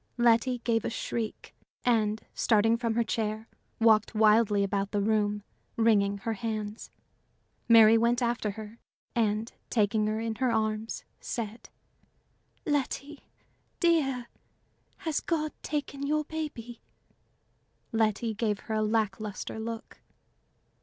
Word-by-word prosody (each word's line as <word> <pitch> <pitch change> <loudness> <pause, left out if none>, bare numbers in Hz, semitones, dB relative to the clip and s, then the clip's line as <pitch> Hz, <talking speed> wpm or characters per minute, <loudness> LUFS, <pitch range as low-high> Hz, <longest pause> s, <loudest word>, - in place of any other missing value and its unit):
Letty 240 +1 +3
gave 225 -2 +1
a - - -1
shriek, 230 -1 -4 0.3
and, 220 -3 +1
starting 225 0 +3
from 230 -1 -1
her 235 - +3
chair, 220 0 -2 0.3
walked 220 -2 +4
wildly 215 -1 +4
about 200 0 -1
the 205 - -1
room, 210 0 +1 0.3
wringing 205 -3 +3
her 225 +3 -3
hands. 215 0 -4 0.8
Mary 225 -1 +8
went 235 +1 +2
after 235 -3 0
her, 215 +2 -8 0.4
and 220 0 0 0.2
taking 215 -1 +2
her 215 +1 -1
in 225 0 -2
her 255 -1 +1
arms, 220 0 -1
said: 225 -1 -5 1.0
"Letty, 290 0 -2 0.5
dear, 275 -8 +2 0.7
has 320 -3 -1
God 310 -2 -1
taken 280 -2 -3
your 305 +1 +1
baby?" 285 -7 -6 1.1
Letty 220 0 +1
gave 210 -2 -1
her 220 - -5
a 215 - +1
lack 215 -2 +1
luster 215 +1 -5
look. 225 0 -6
225 Hz, 120 wpm, -29 LUFS, 215-240 Hz, 1.1 s, Mary